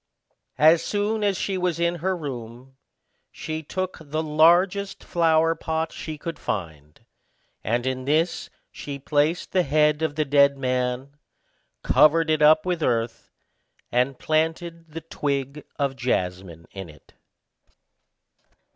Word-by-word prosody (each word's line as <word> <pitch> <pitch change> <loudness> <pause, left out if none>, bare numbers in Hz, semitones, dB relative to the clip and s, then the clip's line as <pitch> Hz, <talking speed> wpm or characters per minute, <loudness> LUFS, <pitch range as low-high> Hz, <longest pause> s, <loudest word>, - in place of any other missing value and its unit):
As 160 +2 +6
soon 210 +1 -1
as 200 -2 +1
she 190 -1 -2
was 180 -2 -1
in 170 0 0
her 185 +3 -1
room, 130 -3 -8 0.6
she 160 0 -5
took 185 +4 -4
the 155 +1 -3
largest 175 +6 +3
flower 165 -1 +2
pot 160 0 -3
she 155 -1 -7
could 165 +3 -6
find, 75 -6 -6 0.6
and 120 +2 -1
in 130 0 -2
this 160 +4 0 0.2
she 140 -1 -7
placed 150 +4 0
the 185 - +3
head 150 0 +2
of 160 -2 -1
the 155 0 0
dead 140 0 +4
man, 130 +1 -2 0.7
covered 160 +1 +4
it 155 - +1
up 155 +2 +5
with 180 -2 -1
earth, 115 -3 -1 0.6
and 125 +2 +1
planted 165 +1 -2
the 165 +2 -7
twig 140 -2 -3
of 140 -2 -1
jasmine 90 -8 -3
in 95 -3 -8
it. 75 - -18
150 Hz, 130 wpm, -24 LUFS, 130-165 Hz, 0.7 s, As